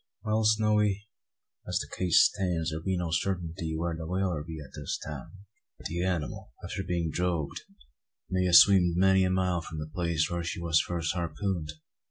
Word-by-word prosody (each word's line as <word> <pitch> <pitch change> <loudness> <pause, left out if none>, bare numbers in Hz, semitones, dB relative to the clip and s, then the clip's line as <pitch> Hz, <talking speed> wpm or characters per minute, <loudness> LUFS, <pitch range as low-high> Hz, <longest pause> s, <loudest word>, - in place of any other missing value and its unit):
"Well, 110 +1 +1
Snowy, 105 -1 +2 0.6
as - - 0
the - - -3
case 90 -3 +4
stands, 85 -4 0
thear 80 +1 -4
be 95 +2 -1
no 85 -2 -2
sartinty 85 -2 -2
where 85 0 -2
the 80 0 -6
whaler 90 -3 -1
be 80 0 -7
at 70 -3 -11
this 75 -2 -4
time. 80 +7 -9 0.4
The 85 +3 -2
anymal, 90 -5 -3
after - - -4
being 85 -4 -2
drogued, 85 -4 -2 0.7
may 90 0 0
a' - - +1
sweemed 90 -2 +7
many 95 0 +5
a - - +1
mile 90 -2 +1
from 80 -1 -8
the 75 - -4
place 85 -4 0
where 85 -1 -3
she 85 - -4
war 85 -1 -4
first 80 +1 +1
harpooned. 85 -1 -3
85 Hz, 180 wpm, -29 LUFS, 80-95 Hz, 0.7 s, sweemed